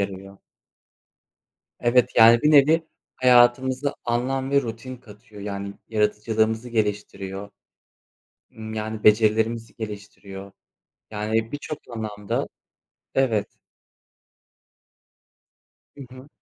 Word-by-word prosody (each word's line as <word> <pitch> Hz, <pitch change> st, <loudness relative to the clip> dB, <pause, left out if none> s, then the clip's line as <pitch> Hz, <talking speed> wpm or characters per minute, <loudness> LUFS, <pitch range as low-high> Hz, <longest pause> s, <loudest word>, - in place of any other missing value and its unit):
yarıyor. 100 Hz, 0 st, -6 dB, 1.4 s
Evet, 120 Hz, 0 st, +3 dB
yani, 115 Hz, +1 st, +7 dB
bir 150 Hz, -, +4 dB
nevi 155 Hz, +3 st, +5 dB, 0.3 s
hayatımıza 130 Hz, +2 st, +3 dB
anlam 130 Hz, +3 st, -1 dB
ve 140 Hz, 0 st, +3 dB
rutin 120 Hz, +2 st, -7 dB
katıyor. 110 Hz, -2 st, -15 dB
Yani, 100 Hz, -1 st, -5 dB
yaratıcılığımızı 110 Hz, +2 st, 0 dB
geliştiriyor. 100 Hz, -3 st, -3 dB, 1.0 s
Imm, 110 Hz, 0 st, -9 dB
yani, 110 Hz, 0 st, -5 dB
becerilerimizi 110 Hz, +1 st, +2 dB
geliştiriyor. 100 Hz, -2 st, -9 dB, 0.6 s
Yani, 110 Hz, +1 st, -1 dB
birçok 145 Hz, +1 st, -5 dB
anlamda 105 Hz, -3 st, -4 dB, 0.7 s
Evet. 115 Hz, -6 st, 0 dB, 2.4 s
Hı 140 Hz, -, -12 dB, 0.2 s
hı. 130 Hz, +3 st, -13 dB
110 Hz, 85 wpm, -23 LUFS, 105-125 Hz, 2.4 s, yani